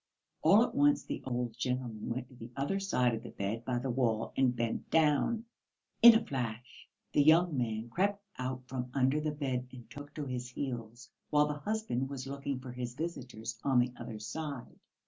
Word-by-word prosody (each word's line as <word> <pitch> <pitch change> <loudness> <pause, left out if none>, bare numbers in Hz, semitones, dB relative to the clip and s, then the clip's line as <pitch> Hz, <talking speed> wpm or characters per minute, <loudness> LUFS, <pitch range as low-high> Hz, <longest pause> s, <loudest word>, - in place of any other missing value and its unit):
All 215 +3 +7
at - - -2
once 290 +1 +4
the - - -4
old 120 -2 -2
gentleman 125 -4 -2
went 125 +1 -3
to - - -17
the 115 0 -9
other 145 +9 0
side 125 -11 +2
of 110 - -3
the - - -8
bed 105 +4 -3
by 125 0 -1
the 125 +1 -1
wall 115 -3 0
and 130 -2 +3
bent 115 -1 -2
down. 160 +9 +3 0.6
In 235 -1 +11
a 225 - +2
flash 125 -2 -5 0.2
the - - +5
young 160 +2 +5
man 115 -3 -1
crept 200 - 0
out 130 0 -3
from 125 -1 -4
under 135 +3 +3
the 155 - 0
bed 135 -4 -2
and 120 -3 -11
took 145 +3 -9
to 150 - -3
his 125 -2 -4
heels, 120 -2 -5 0.2
while 150 0 +5
the 150 - -1
husband 150 - -2
was 135 -2 -5
looking 140 -1 -3
for 130 -1 -8
his 125 -1 -5
visitors 125 -7 -5
on 135 -2 +3
the 125 0 +3
other 110 - -7
side. 140 +4 -6
130 Hz, 195 wpm, -32 LUFS, 120-150 Hz, 0.6 s, In